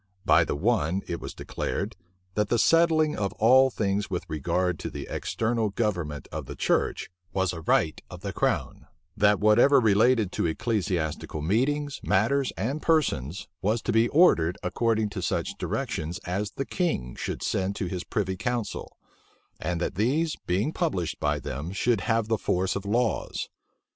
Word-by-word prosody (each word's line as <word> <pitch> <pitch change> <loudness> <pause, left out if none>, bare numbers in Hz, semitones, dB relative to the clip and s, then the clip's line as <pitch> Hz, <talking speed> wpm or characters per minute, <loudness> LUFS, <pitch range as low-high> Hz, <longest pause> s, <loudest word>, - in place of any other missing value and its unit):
By - - +6
the - - -2
one 95 0 +1
it 85 - -4
was - - -7
declared, 100 +1 -3 0.4
that 105 +1 0
the 120 - +2
settling 160 +2 +4
of 100 -2 -2
all 130 +4 +5
things 105 -3 -1
with 90 -3 -3
regard 85 +3 -1
to - - -4
the - - -6
external 115 -1 -1
government 90 -9 -2
of - - -5
the - - -7
church, - - 0 0.2
was 95 -1 +1
a 80 - -6
right 80 -1 +1
of 90 0 -10
the 100 -1 -4
crown: - - -1 0.3
that 105 -1 +4
whatever 120 +7 +5
related 110 -1 +3
to - - 0
ecclesiastical 85 -6 -2
meetings, 140 - 0
matters, 115 +8 +2
and 130 - -2
persons, 95 - 0
was 110 +4 +1
to - - 0
be 115 +1 +4
ordered 90 - +4
according 110 +3 +1
to 100 - -5
such - - -1
directions 80 +3 -3
as 100 +4 -2
the 135 - -3
king 145 - -1
should - - -4
send 95 +1 -1
to 95 - -2
his 90 0 -4
privy 95 -5 -2
council: 120 +3 -3 0.6
and 90 -1 -2
that 90 - -2
these, 140 - +1
being 100 - 0
published 90 - -1
by 75 0 +1
them 70 +6 -5
should 110 +2 +1
have 115 -2 +1
the 110 -2 0
force 95 +1 0
of 100 0 -4
laws. 120 +4 -1
105 Hz, 165 wpm, -27 LUFS, 90-120 Hz, 0.6 s, By